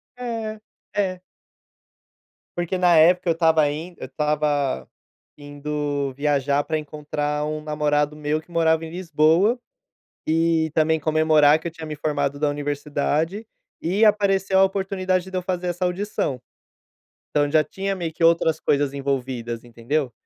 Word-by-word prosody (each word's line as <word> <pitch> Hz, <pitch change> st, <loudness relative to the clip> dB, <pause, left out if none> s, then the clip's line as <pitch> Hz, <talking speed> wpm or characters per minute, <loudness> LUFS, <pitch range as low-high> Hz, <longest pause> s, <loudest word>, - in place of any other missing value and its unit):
É, 225 Hz, -3 st, -5 dB, 0.3 s
é. 185 Hz, -3 st, -1 dB, 1.4 s
Porque 175 Hz, +2 st, -1 dB
na 175 Hz, -2 st, +4 dB
época 175 Hz, +3 st, +5 dB
eu -, -, +4 dB
estava 160 Hz, -2 st, +3 dB
indo 165 Hz, +4 st, -6 dB
eu -, -, -6 dB
estava 145 Hz, -, 0 dB, 0.5 s
indo 145 Hz, -1 st, -3 dB
viajar 140 Hz, 0 st, +1 dB
para 155 Hz, -, -1 dB
encontrar 150 Hz, 0 st, -3 dB
um 155 Hz, 0 st, -3 dB
namorado 150 Hz, -1 st, 0 dB
meu 150 Hz, +1 st, -1 dB
que 175 Hz, -, -22 dB
morava 165 Hz, -1 st, +2 dB
em 160 Hz, -, -9 dB
Lisboa, 170 Hz, -, +2 dB, 0.7 s
e 160 Hz, 0 st, +2 dB
também 160 Hz, 0 st, +2 dB
comemorar 155 Hz, -1 st, +4 dB
que 160 Hz, -, -10 dB
eu -, -, -6 dB
tinha 165 Hz, -1 st, -8 dB
me 155 Hz, -1 st, -5 dB
formado 145 Hz, -1 st, -1 dB
da 150 Hz, -, +1 dB
universidade, 145 Hz, +6 st, -2 dB, 0.4 s
e 190 Hz, +7 st, +2 dB
apareceu 195 Hz, -2 st, +3 dB
a 190 Hz, -, +7 dB
oportunidade 190 Hz, -1 st, -1 dB
de 190 Hz, -, -4 dB
eu 185 Hz, -, -1 dB
fazer 180 Hz, -1 st, -2 dB
essa 175 Hz, +1 st, -2 dB
audição. 180 Hz, -, -2 dB, 0.9 s
Então 145 Hz, -1 st, +1 dB
já 155 Hz, 0 st, +4 dB
tinha 195 Hz, +6 st, -3 dB
meio 170 Hz, -3 st, -4 dB
que 160 Hz, -, -6 dB
outras 165 Hz, -1 st, +3 dB
coisas 145 Hz, -1 st, +1 dB
envolvidas, 130 Hz, -4 st, -3 dB
entendeu? 120 Hz, +4 st, -2 dB
155 Hz, 145 wpm, -23 LUFS, 145-180 Hz, 1.4 s, a